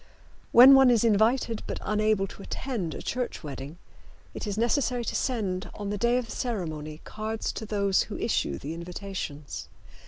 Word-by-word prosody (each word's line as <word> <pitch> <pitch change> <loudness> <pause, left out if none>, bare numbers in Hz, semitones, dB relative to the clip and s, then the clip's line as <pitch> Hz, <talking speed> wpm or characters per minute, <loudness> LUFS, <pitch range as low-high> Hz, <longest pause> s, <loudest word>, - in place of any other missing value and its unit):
When 255 +3 +10
one 270 -1 +7
is 235 -3 +4
invited 225 +1 +2
but - - -3
unable 215 -1 +1
to 195 - -11
attend 200 -6 -4
a - - -7
church 250 -6 -3
wedding 140 +2 -7 0.6
it - - -5
is 205 0 -3
necessary 240 +1 +1
to - - -3
send, 200 -7 -1
on 205 -1 -4
the - - -1
day 235 +2 +3
of 250 - -1
the 225 - -10
ceremony, 155 -10 -4
cards 220 +1 -4
to 220 - -6
those 200 -2 +2
who - - -5
issue 70 - 0
the 150 +4 -6
invitations. 170 -4 -6
215 Hz, 175 wpm, -27 LUFS, 180-235 Hz, 0.6 s, When